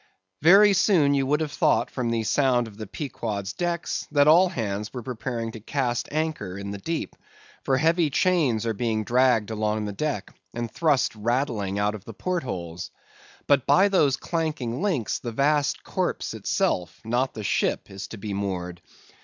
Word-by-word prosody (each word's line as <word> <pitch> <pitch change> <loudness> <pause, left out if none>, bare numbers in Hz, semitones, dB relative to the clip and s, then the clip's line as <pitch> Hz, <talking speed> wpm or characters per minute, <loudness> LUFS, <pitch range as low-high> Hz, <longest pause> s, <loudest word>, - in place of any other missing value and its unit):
Very 200 +6 +7
soon 175 -7 +4
you 135 -1 +1
would 150 +3 +1
have 155 -2 -2
thought 155 -2 +2
from 125 -3 -2
the 115 -1 0
sound 125 +1 +2
on 110 - -11
the 110 0 -8
Pequod's 105 -7 -4
decks, 175 -1 -2
that 145 -1 +4
all 175 +4 +6
hands 105 - -3
were 125 -2 -6
preparing 115 -1 -4
to 110 - -9
cast 120 +1 -2
anchor 155 -11 -2
in 100 0 -5
the 100 - -6
deep; 165 +10 -4 0.5
for 130 - +2
heavy 165 +2 +2
chains 140 -8 +2
are 115 - 0
being 110 0 -1
dragged 120 -3 +2
along 110 0 -1
the 105 - -3
deck, 105 -3 -3 0.2
and 120 -1 -3
thrust 150 -7 +2
rattling 110 -3 -1
out 105 +1 +1
of 105 -3 -8
the 115 0 -10
port 180 - -1
holes. 85 - -5 0.6
But 140 -3 +3
by 195 +2 +5
those 145 -9 +3
clanking 155 -6 -2
links, 170 - 0
the 120 - -5
vast 145 +4 +1
corpse - - -2
itself, 90 -1 -1
not 120 +4 0
the 110 - -5
ship, 100 - 0
is 95 0 -7
to 115 - -9
be 100 0 -5
moored. 90 -3 -4
120 Hz, 180 wpm, -25 LUFS, 105-150 Hz, 0.6 s, Very